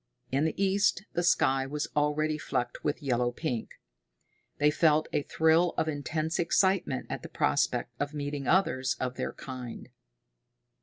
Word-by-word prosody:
In 140 +4 +2
the 160 - -2
east 195 -1 +2
the 175 - 0
sky 135 -6 +2
was 150 +2 -3
already 150 +1 +1
flecked 120 -4 -3
with 150 +1 -2
yellow 125 -2 +1
pink. 120 -3 -3 0.9
They 150 +1 +4
felt 155 0 +3
a - - +2
thrill 160 +4 +2
of 160 - +1
intense 155 +2 -2
excitement 175 -5 +2
at - - -5
the - - -9
prospect 70 - 0
of 145 0 -1
meeting 145 -2 -4
others 135 -9 +2
of 125 -1 -2
their - - -3
kind. 125 -2 -8
150 Hz, 150 wpm, -29 LUFS, 135-160 Hz, 0.9 s, They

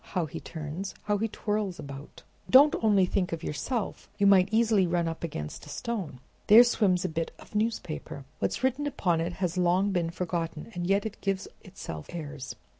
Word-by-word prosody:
How 180 -3 +2
he 145 - -7
turns! 160 +4 -6
how 205 -1 0
he 225 - +1
twirls 210 -3 -2
about! 140 0 -9 0.3
Don't 285 +3 +8
think - - -4
only 200 -4 +4 0.2
of 165 0 -4
yourself, 220 - -3
you 200 - +2
might 190 -1 +6
easily 220 -4 +3
run 170 -1 +1
up 165 0 -5
against 75 - -5
a - - -10
stone. 195 - -4 0.3
There 220 +3 +10
swims 205 -7 +2
a - - +2
bit 165 +1 -2
of - - -16
newspaper. 210 -10 -3
What's - - -1
written 265 +3 +1
upon 180 - 0
it 170 +2 -2
has 180 0 -2
long 180 +3 +3
been 175 -3 0
forgotten, 170 0 -4
and 175 -2 -3
yet 195 +2 +2
it 220 - -6
gives 195 -1 -1 0.2
itself 80 - -8
airs. 145 -5 -6
185 Hz, 190 wpm, -28 LUFS, 165-210 Hz, 0.3 s, There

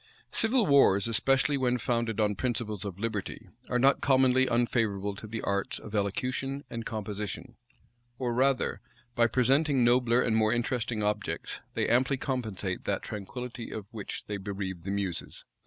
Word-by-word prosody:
Civil 230 0 +3
wars, 135 - +5
especially 135 +4 +2
when 125 -2 +1
founded 115 -2 -1
on 105 -1 +3
principles 110 -3 -2
of 100 -3 -5
liberty 105 -2 -4 0.2
are 125 - +1
not 135 +2 +4
commonly 130 -1 +4
unfavorable 110 -4 +1
to 105 +2 -9
the 110 +1 -5
arts 100 0 -1
of 105 - -10
elocution 130 +7 -1
and 115 -1 -4
composition; 105 +2 -5 0.6
or 125 -2 -1
rather, 130 +1 +1 0.3
by 120 -1 +4
presenting 135 +2 +3
nobler 120 0 +4
and 115 -3 +2
more 110 -1 +3
interesting 120 -2 -1
objects, 105 0 -2 0.2
they - - +1
amply 130 +3 +3
compensate 110 -9 -3
that - - -1
tranquillity 120 +3 -6
of 110 -3 -6
which 105 -3 -6
they 105 - -3
bereave 95 -3 -5
the - - -3
muses. 100 -3 -3
115 Hz, 155 wpm, -29 LUFS, 105-130 Hz, 0.6 s, wars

